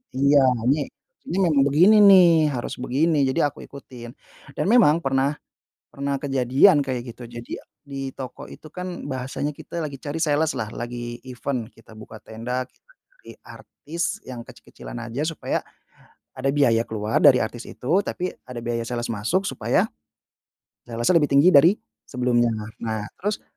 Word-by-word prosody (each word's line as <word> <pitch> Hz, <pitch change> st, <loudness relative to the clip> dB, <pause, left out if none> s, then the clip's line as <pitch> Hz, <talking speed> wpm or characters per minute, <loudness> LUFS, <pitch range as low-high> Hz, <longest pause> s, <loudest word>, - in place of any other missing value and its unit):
Iya, 140 Hz, +1 st, +4 dB, 0.3 s
ini 145 Hz, -1 st, 0 dB, 0.4 s
ini 175 Hz, -, -3 dB
memang 155 Hz, -7 st, +3 dB
begini 180 Hz, +10 st, +6 dB
nih, 175 Hz, -5 st, +7 dB
harus 120 Hz, -, -5 dB
begini, 145 Hz, +3 st, +1 dB
jadi 145 Hz, +3 st, +2 dB
aku -, -, -16 dB
ikutin. 125 Hz, -3 st, -11 dB, 0.4 s
Dan -, -, -1 dB
memang 170 Hz, -9 st, +5 dB
pernah 135 Hz, +2 st, +1 dB, 0.6 s
pernah 140 Hz, 0 st, -3 dB
kejadian 140 Hz, +4 st, +4 dB
kayak 125 Hz, -3 st, -5 dB
gitu. 125 Hz, -, -10 dB
Jadi 120 Hz, 0 st, -7 dB, 0.3 s
di 135 Hz, -1 st, -5 dB
toko 130 Hz, -2 st, -8 dB
itu -, -, -13 dB
kan, 180 Hz, -3 st, -6 dB
bahasanya 135 Hz, +2 st, -3 dB
kita 160 Hz, +3 st, -8 dB
lagi 145 Hz, -2 st, -6 dB
cari 145 Hz, +2 st, -5 dB
sales-lah 145 Hz, -7 st, 0 dB
lagi 120 Hz, 0 st, -6 dB
event, 125 Hz, -2 st, -4 dB
kita 115 Hz, 0 st, -17 dB
buka 110 Hz, 0 st, -11 dB
tenda, 125 Hz, +4 st, -4 dB
kita -, -, -33 dB, 0.3 s
cari -, -, -11 dB
artis 170 Hz, +7 st, -5 dB
yang 125 Hz, -2 st, -7 dB
kecil-kecilan 120 Hz, -, -11 dB
aja, 130 Hz, +6 st, -3 dB
supaya 165 Hz, -, -3 dB, 0.7 s
ada 135 Hz, +1 st, 0 dB
biaya 125 Hz, -6 st, +3 dB
keluar 110 Hz, -1 st, -2 dB
dari 140 Hz, -4 st, +7 dB
artis 115 Hz, +2 st, -5 dB
itu, 170 Hz, +10 st, 0 dB
tapi 180 Hz, +1 st, -3 dB
ada 125 Hz, -1 st, -8 dB
biaya 115 Hz, 0 st, -2 dB
sales 120 Hz, 0 st, -3 dB
masuk, 115 Hz, -, -1 dB
supaya -, -, 0 dB, 1.0 s
sales-nya 120 Hz, +8 st, 0 dB
lebih 145 Hz, -, +1 dB
tinggi 140 Hz, +6 st, +6 dB
dari 145 Hz, +5 st, +7 dB, 0.4 s
sebelumnya. 125 Hz, -2 st, +1 dB, 0.3 s
Nah, 110 Hz, -2 st, -3 dB, 0.2 s
terus, 205 Hz, +2 st, -3 dB
135 Hz, 150 wpm, -23 LUFS, 120-155 Hz, 1.0 s, nih